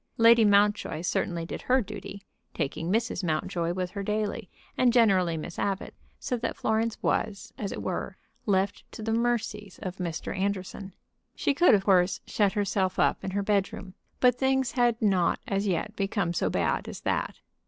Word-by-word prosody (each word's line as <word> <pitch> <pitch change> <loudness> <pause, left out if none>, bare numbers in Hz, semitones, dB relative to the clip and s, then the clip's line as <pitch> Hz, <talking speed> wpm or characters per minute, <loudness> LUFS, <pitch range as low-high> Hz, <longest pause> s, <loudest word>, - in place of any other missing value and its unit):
Lady 230 0 +7
Mountjoy 205 -5 +3
certainly 170 -1 -1
did - - -6
her 260 +1 +3
duty, 205 -2 -7 0.3
taking 160 +3 -2
Mrs. 225 -1 0
Mountjoy 165 +1 -1
with 180 -1 -3
her 200 - -4
daily, 210 0 -2 0.3
and 250 -1 +4
generally 190 -8 +3
Miss 165 +2 -6
Abbott, 195 -1 -2 0.3
so 250 - -2
that 235 - -3
Florence 220 +1 0
was, 225 +3 -1
as 200 -3 -4
it - - -5
were, - - -3 0.3
left 195 0 +1
to 220 - -7
the 225 +1 -1
mercies 225 -4 -1
of 185 0 -5
Mr. 170 -1 -4
Anderson. 195 0 -3 0.4
She 285 - +1
could, 340 -4 +6
of 195 -1 -1
course, 180 -2 +3
shut 205 -3 +1
herself 195 -3 0
up - - +2
in - - -2
her 200 +1 -1
bedroom, 195 -2 -1 0.3
but 250 -1 +4
things 265 -2 +2
had 240 -2 +2
not 185 -5 +2
as 200 +1 0
yet 195 +4 -1
become 195 -3 -1
so 95 - 0
bad 85 -4 0
as - - -8
that. - - -1
200 Hz, 175 wpm, -27 LUFS, 185-225 Hz, 0.4 s, Lady